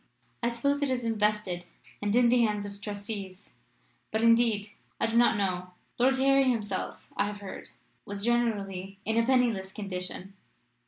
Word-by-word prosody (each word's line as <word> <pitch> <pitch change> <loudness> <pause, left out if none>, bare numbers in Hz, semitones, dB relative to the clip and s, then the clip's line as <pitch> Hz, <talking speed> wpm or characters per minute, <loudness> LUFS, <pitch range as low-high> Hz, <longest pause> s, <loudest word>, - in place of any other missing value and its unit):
"I 235 - +2
suppose 280 +5 0
it 285 - +1
is 255 -2 -1
invested 210 -5 0 0.4
and 205 +1 0
in 245 -1 +5
the 245 +1 +4
hands 210 -2 +1
of 200 0 -9
trustees. 200 -2 -6 0.6
But, 220 +1 -1
indeed, 230 -3 +4 0.3
I - - +2
do 225 0 -1
not 235 -1 +5
know. 180 -2 -2 0.2
Lord 260 +2 +4
Harry 275 0 +4
himself, 210 -6 -2
I 200 - +1
have 205 0 -5
heard, 200 - -8 0.3
was 200 +1 -4
generally 200 -5 0
in 220 - 0
a 230 - +3
penniless 235 -7 +2
condition. 190 -1 -6
210 Hz, 160 wpm, -29 LUFS, 200-235 Hz, 0.6 s, in